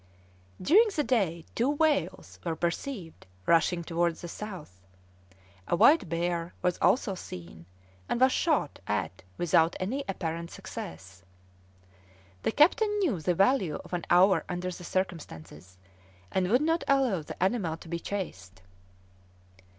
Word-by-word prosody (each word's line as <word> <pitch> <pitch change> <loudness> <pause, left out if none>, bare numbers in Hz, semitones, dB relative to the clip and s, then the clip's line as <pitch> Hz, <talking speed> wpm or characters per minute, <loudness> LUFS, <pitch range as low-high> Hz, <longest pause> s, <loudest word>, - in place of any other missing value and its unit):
During 400 - +5
the 300 - +1
day 185 - 0
two 240 +4 +1
whales 290 - 0
were 165 -2 -2
perceived 175 - -4 0.2
rushing 170 +1 +3
towards 170 0 -1
the 175 - -6
south; 170 - -8 0.9
a - - +2
white 305 - +5
bear 170 0 -2
was 180 -1 +1
also 230 -5 +2
seen, 85 - -9 0.4
and - - 0
was 260 +1 +5
shot 300 - 0
at 105 -3 -2 0.2
without 165 0 +3
any 250 +10 -2
apparent 170 -3 -3
success. 90 +2 -9 1.2
The - - 0
captain 415 - +4
knew 295 - 0
the 175 +2 +1
value 195 - +2
of - - -12
an 175 -1 -2
hour 185 +2 +5
under 180 0 -3
the 180 - -9
circumstances, 95 - -5 0.5
and 185 -1 0
would 250 +7 +3
not 325 +2 +1
allow 260 -10 +2
the 150 - -9
animal 190 -6 0
to 165 - -14
be 170 +1 -3
chased. 95 - -6
175 Hz, 135 wpm, -29 LUFS, 165-240 Hz, 1.2 s, During